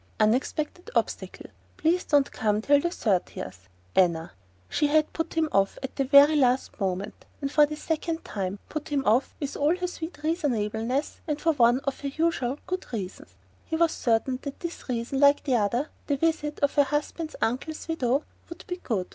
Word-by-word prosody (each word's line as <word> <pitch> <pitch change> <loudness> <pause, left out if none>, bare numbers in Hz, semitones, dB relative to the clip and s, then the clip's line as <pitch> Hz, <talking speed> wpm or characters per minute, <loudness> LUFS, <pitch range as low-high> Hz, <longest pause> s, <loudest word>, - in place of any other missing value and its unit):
"Unexpected 275 - 0
obstacle. - - -2 0.3
Please 340 +3 +2
don't 285 -2 +3
come 210 -1 0
till 285 +6 +4
thirtieth. 180 - -2 0.3
Anna." 170 -3 +2 0.4
She 295 - +1
had 310 +1 +2
put 325 - -3
him 325 -1 +2
off 195 0 +2
at 265 - -5
the 275 - +1
very 285 +3 +7
last 255 -4 +2
moment, 190 0 -3 0.2
and 275 -1 -3
for 295 0 +5
the 305 - -5
second 325 +1 -3
time: 195 -1 -3
put 310 0 -5
him 285 -2 0
off 235 +6 +2
with 285 -2 -4
all 300 +4 +2
her 365 - -2
sweet 345 -1 -6
reasonableness, 255 -5 -1
and 300 -1 -1
for 325 +1 +2
one 245 -1 +4
of 275 -1 -3
her 285 - -4
usual 280 -3 0
"good" 370 -5 -4
reasons 185 - -6 0.3
he - - -3
was 330 0 +3
certain 245 +2 0
that 280 -1 -7
this 340 -5 -6
reason, 245 +2 -2
like 285 0 +5
the 265 - 0
other, 235 +7 +1 0.2
(the 285 - +1
visit 300 -1 0
of 285 - +2
her 290 - +5
husband's 300 +3 -3
uncle's 270 +9 -2
widow) 280 -3 +1 0.3
would 340 - -10
be 360 - -4
"good"! 215 - -2
280 Hz, 180 wpm, -27 LUFS, 230-315 Hz, 0.4 s, very